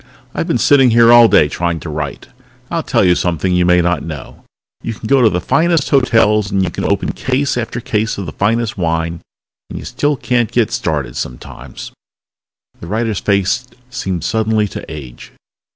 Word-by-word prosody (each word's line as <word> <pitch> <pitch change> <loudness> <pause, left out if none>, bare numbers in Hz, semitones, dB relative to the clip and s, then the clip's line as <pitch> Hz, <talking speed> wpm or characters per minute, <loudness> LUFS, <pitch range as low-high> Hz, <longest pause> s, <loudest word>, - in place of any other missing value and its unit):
"I've - - -3
been - - +1
sitting 135 -3 +4
here 115 0 +5
all 120 -1 +8
day 75 - +4
trying 85 +2 -2
to 85 - -7
write. 75 -2 -5 0.4
I'll - - 0
tell - - +1
you 90 - +5
something 90 +1 -1
you 90 0 +2
may 90 0 +4
not 85 -3 0
know 75 -6 -9 0.4
you 115 - -5
can 110 - -11
go 135 +3 +3
to 115 - +5
the 90 - -1
finest 165 - +1
hotels, 110 -6 +3
and 95 -1 0
you 95 - -2
can - - -4
open - - 0
case 135 +2 -1
after 120 0 -3
case 110 -1 -2
of 100 - -4
the 80 - -6
finest 110 +2 -1
wine, 80 0 -2 0.5
and - - -7
you - - -8
still 145 0 -1
can't 120 -3 0
get 120 -3 +1
started 75 -5 -2
sometimes." - - -8 0.9
The 85 - -9
writer's 110 +1 -1
face 100 +5 0 0.2
seemed 95 -8 -3
suddenly 110 0 0
to - - -7
age. 70 -6 -10
105 Hz, 185 wpm, -16 LUFS, 85-120 Hz, 0.9 s, all